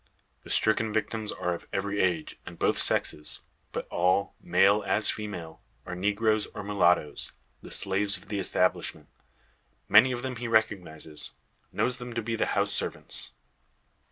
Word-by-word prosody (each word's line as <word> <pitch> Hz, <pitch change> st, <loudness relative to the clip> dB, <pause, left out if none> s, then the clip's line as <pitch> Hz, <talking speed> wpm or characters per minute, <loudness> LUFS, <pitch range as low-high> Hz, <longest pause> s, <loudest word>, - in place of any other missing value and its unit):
The -, -, -13 dB
stricken 110 Hz, 0 st, +2 dB
victims 110 Hz, 0 st, -2 dB
are 90 Hz, -, -2 dB
of 85 Hz, -, -8 dB
every 100 Hz, +1 st, -2 dB
age, 85 Hz, -4 st, -1 dB
and -, -, -10 dB
both -, -, +1 dB
sexes. 75 Hz, 0 st, +1 dB, 0.3 s
But -, -, -4 dB
all, 90 Hz, +3 st, +1 dB
male 100 Hz, +2 st, +4 dB
as 105 Hz, -, +2 dB
female, 95 Hz, -7 st, -7 dB, 0.2 s
are -, -, -6 dB
negroes 105 Hz, +3 st, +1 dB
or 105 Hz, -, -5 dB
mulattoes 90 Hz, -7 st, +1 dB, 0.3 s
the -, -, -10 dB
slaves 100 Hz, 0 st, +1 dB
of 90 Hz, -, -15 dB
the 105 Hz, -2 st, -2 dB
establishment. -, -, 0 dB, 0.8 s
Many 125 Hz, +5 st, +7 dB
of 120 Hz, 0 st, -3 dB
them 130 Hz, -2 st, -3 dB
he 120 Hz, +1 st, -4 dB
recognises; 90 Hz, -9 st, -1 dB, 0.4 s
knows 125 Hz, 0 st, 0 dB
them 125 Hz, -1 st, -7 dB
to 115 Hz, -, -1 dB
be 115 Hz, +1 st, -2 dB
the 115 Hz, -, 0 dB
house -, -, +2 dB
servants. -, -, +1 dB
105 Hz, 155 wpm, -28 LUFS, 90-110 Hz, 0.8 s, Many